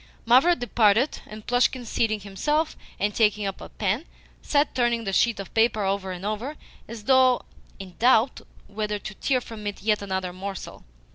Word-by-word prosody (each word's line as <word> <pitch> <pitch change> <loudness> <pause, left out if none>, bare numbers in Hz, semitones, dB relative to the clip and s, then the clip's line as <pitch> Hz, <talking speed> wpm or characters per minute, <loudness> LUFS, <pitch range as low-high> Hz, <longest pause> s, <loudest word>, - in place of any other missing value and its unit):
Mavra 260 +10 +5
departed, 235 0 +2
and 215 0 -10
Plushkin, 245 0 +1
seating 215 -1 0
himself, 295 +11 -1 0.2
and 205 +2 0
taking 210 -1 +2
up 195 -1 -4
a - - -9
pen, 210 - -1 0.4
sat 290 0 +1
turning 240 -2 +1
the 195 -2 -3
sheet 235 +1 +2
of 195 - -8
paper 225 -2 +2
over 195 -1 -1
and 180 +1 -6
over, 220 +8 -3 0.3
as 225 -1 -8
though 260 0 +4 0.3
in 190 -2 -10
doubt 245 +1 +3 0.2
whether 210 0 -3
to 205 0 -8
tear 255 +5 0
from 220 -3 -8
it 205 - -5
yet 210 -1 +2
another 190 -2 -3
morsel. 195 +1 -7
215 Hz, 170 wpm, -25 LUFS, 200-245 Hz, 0.4 s, Mavra